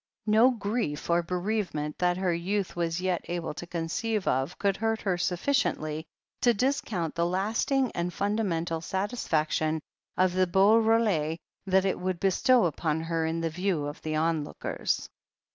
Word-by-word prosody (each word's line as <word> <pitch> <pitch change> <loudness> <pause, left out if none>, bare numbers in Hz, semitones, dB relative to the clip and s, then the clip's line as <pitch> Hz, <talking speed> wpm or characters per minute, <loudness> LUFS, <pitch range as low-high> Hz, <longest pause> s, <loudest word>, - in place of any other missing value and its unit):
No 220 +4 +6
grief 210 - -2
or 170 0 +4
bereavement 180 -4 -2
that 180 0 +2
her 185 -2 +1
youth 190 +3 -2
was 170 0 -1
yet 185 -2 0
able 170 -3 -3
to 175 - -8
conceive 185 +6 -2
of 135 +7 0
could 200 -1 +1
hurt 225 0 0
her 190 -3 0
sufficiently 175 - 0 0.4
to 240 -2 +4
discount 210 - -1
the 170 0 +1
lasting 220 +8 +1
and 175 +1 -2
fundamental 180 -5 -1
satisfaction 160 -5 0 0.4
of 185 -1 +3
the 185 0 +2
beau 195 +5 +5
role 215 -9 +2 0.3
that 190 0 +3
it 190 - 0
would 185 -1 -2
bestow 215 +5 +4
upon 160 -1 -1
her 165 0 -1
in 165 +1 -2
the 165 -1 -1
view 180 -3 -1
of 145 +1 -6
the 155 -1 -2
onlookers. 155 -1 -1
180 Hz, 155 wpm, -28 LUFS, 165-205 Hz, 0.4 s, No